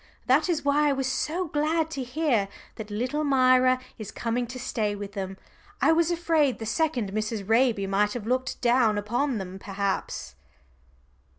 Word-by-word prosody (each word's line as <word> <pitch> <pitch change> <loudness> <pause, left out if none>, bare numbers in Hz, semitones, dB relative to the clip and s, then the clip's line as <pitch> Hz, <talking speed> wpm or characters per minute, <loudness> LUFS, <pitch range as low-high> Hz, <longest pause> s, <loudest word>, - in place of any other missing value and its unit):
That 285 +8 +3
is 315 -4 0
why 295 +1 +3
I - - +2
was 270 -1 -2
so 305 +7 -1
glad 315 +2 0
to 275 - -4
hear 250 -5 0 0.3
that 215 -1 -7
little 250 +8 -2
Myra 255 -2 +4 0.2
is 215 -2 -6
coming 240 +1 -2
to 250 +2 -7
stay 220 -5 -2
with 205 0 -6
them. 190 -1 -5 0.4
I - - +4
was 330 0 +3
afraid 330 -6 +2
the 225 - -6
second 240 -3 0
Mrs. 215 -2 -3
Raby 225 -3 +3
might 205 +2 +1
have 240 -4 -5
looked 255 +2 -1
down 240 -3 +3
upon 240 +5 -1
them 190 -1 -6
perhaps." 195 0 -3
250 Hz, 170 wpm, -26 LUFS, 210-290 Hz, 0.4 s, Myra